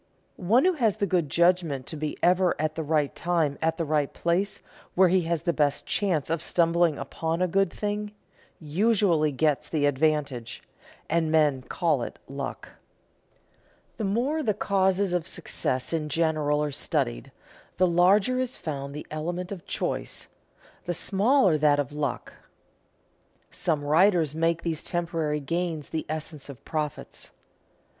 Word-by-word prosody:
One 225 - +3
who 370 - +4
has 230 - +1
the 200 - +1
good 175 -5 0
judgment 170 -6 +2
to 160 - -7
be 155 0 -4
ever 180 -1 +3
at 155 0 0
the 160 - -4
right 150 -2 0
time 165 -5 0
at 160 0 0
the 150 -3 0
place 180 +4 -1 0.4
where 185 0 +5
he 185 +1 +3
has 165 -1 -1
the 170 -1 +1
best 145 -2 0
chance 170 -7 0
of 165 -1 0
stumbling 170 -2 +2
upon 160 +4 -3
a 185 - +2
good 195 +3 +1
thing, 210 0 -3 0.5
usually 170 -1 +2
gets 145 +1 0
the 150 -3 +1
advantage, 140 -4 0 0.4
and 160 0 +1
men 150 -4 +3
call - - 0
it - - -5
luck. - - -6 1.3
The 225 - -3
more 245 +10 0
the 215 -8 0
causes 190 -1 +1
of 175 -1 -1
success 130 -6 -1
in 155 -2 -1
general 150 -1 +1
are 150 - -2
studied, - - -2 0.5
the 185 - +4
larger 190 +8 +3
is 255 0 -2
found 140 -2 -5
the 150 - -6
element 175 +4 -4
of 190 -4 -8
choice, - - -3 0.6
the 175 - -2
smaller 195 - +3
that 145 -1 +4
of 145 -2 -2
luck. 145 -3 -3 1.2
Some 155 -5 -1
writers 160 0 +3
make 165 +1 0
these 165 -2 -1
temporary 165 -3 -2
gains 165 +1 -3
the 160 -1 -4
essence 155 -2 -5
of 135 - -11
profits. 150 -2 -4
165 Hz, 150 wpm, -26 LUFS, 150-185 Hz, 1.3 s, where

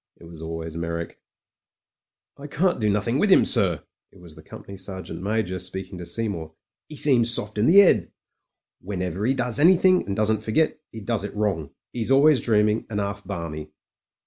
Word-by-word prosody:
It - - -16
was 85 -1 -12
always 80 0 -6
Meyrick,... 85 0 -5 1.2
"I 140 - -10
can't 175 +3 0
do 105 - +2
nothing 105 +6 0
with 205 - +2
'im, - - +6
sir/* 95 - +2 0.3
It 95 - -19
was 85 -3 -14
the 80 - -13
Com - - -12
pany 100 -1 -11
Sergeant 95 -3 -8
Major 100 -2 -2
speaking 95 0 -6
to 85 - -8
Seymour. 85 -9 -4 0.2
" 110 - -66
'E 155 - -9
seems 125 -6 +4
soft 105 -3 0
like - - -4
in 105 - +2
the 200 +3 +9
'ead. 195 - +3 0.7
Whenever 90 -1 -4
'e 135 - +1
does 120 -3 -1
do - - 0
any 180 +4 +6
thing 185 0 +3
and 100 - -2
doesn't 110 0 0
forget, 155 +9 0
'e 110 - -9
does 105 0 -2
it 105 - -7
wrong. 100 -8 -1 0.2
'E's 115 -1 -4
always 140 +1 +5
dreaming 105 -1 +1
and 105 -2 -3
'alf 100 0 -4
balmy." 75 -2 -6
105 Hz, 200 wpm, -24 LUFS, 90-120 Hz, 1.2 s, the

